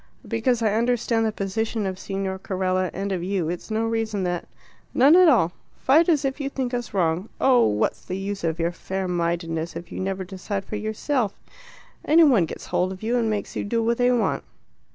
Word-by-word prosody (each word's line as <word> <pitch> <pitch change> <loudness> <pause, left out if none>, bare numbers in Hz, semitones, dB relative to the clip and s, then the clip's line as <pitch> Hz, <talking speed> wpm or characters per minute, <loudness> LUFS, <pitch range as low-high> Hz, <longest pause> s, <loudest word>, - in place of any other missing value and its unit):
"Because 230 +1 +1
I 215 -2 +2
understand 230 0 +1
the - - 0
position 215 +2 -2
of 190 -1 -3
Signor 195 -1 -3
Carella 185 -1 -1
and 195 +2 -3
of 185 -2 -1
you, 185 -3 -1
it's 175 +5 -5
no 220 +1 0
reason 225 -3 -1
that 175 -1 -2 0.3
" - - -33
"None 275 +6 +7
at 365 -2 +7
all. 195 - +4 0.3
Fight 315 +6 +4
as 295 -4 +3
if 270 +2 -2
you 275 - -2
think 260 -2 -3
us 245 -1 -3
wrong. 180 +1 0
Oh, 255 - +5
what's 105 0 0
the 185 - -4
use 195 0 -4
of 165 -1 0
your 170 0 0
fair 190 +2 -4
mindedness 170 -1 -2
if 170 - -8
you - - -5
never 190 0 -2
decide 195 +1 -5
for - - -5
yourself? 215 +2 -1 0.6
Any 325 +3 +6
one 235 - +4
gets - - -8
hold 185 +1 0
of 190 +2 -9
you 235 +3 0
and 230 -2 +1
makes 210 -2 -3
you - - -2
do 230 +2 0
what 235 +1 +1
they 245 0 +4
want. 245 -2 +1
205 Hz, 215 wpm, -24 LUFS, 185-235 Hz, 0.6 s, None